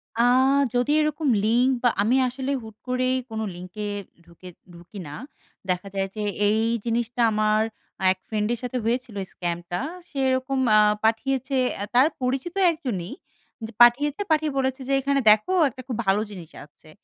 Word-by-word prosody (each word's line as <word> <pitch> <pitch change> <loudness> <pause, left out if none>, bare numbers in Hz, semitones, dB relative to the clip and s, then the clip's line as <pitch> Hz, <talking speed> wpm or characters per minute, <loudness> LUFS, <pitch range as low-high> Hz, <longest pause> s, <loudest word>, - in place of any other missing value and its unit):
আ 230 - +1 0.5
যদি 245 +3 +1
এরকম 305 0 -1 0.2
লিঙ্ক 240 +4 +3
বা 245 - +5
আমি 225 +5 +2
আসলে 260 +2 -4
হুট 220 -1 -11
করেই 255 +1 +1
কোনো 220 0 -4
লিঙ্কে 185 +4 -7 0.4
ঢুকে 175 +1 -13 0.2
ঢুকি 175 +4 -12
না। 145 - -8 0.6
দেখা 180 +2 -1
যায় 195 0 0
যে, 215 - -3 0.2
এই 215 +1 +2 0.2
জিনিসটা 235 +1 -1
আমার 215 0 +2 0.5
এক 190 - -2
ফ্রেন্ড 210 -1 -1
এর 235 - -4
সাথে 250 0 -3
হয়েছিল 240 -1 -2 0.2
স্কামটা 175 0 -4 0.3
সে 280 - -11
এরকম 260 +1 0 0.2
আ - - +7 0.3
পাঠিয়েছে 260 +4 0 0.2
অ্যা 200 - -3
তার 260 +4 +6
পরিচিত 265 +8 -2 0.2
একজনই, 235 - -4 0.6
যে 225 - -11
পাঠিয়েছে, 285 +8 +5
পাঠিয়ে 310 -1 +2
বলেছে 265 0 -1
যে 275 - 0
এখানে 280 +1 +1
দেখো 215 - +2 0.2
একটা 255 +1 -11
খুব 245 - -3
ভালো 195 +2 +2
জিনিস 175 -5 -10
আছে। 150 +1 -22
235 Hz, 160 wpm, -24 LUFS, 205-260 Hz, 0.6 s, আ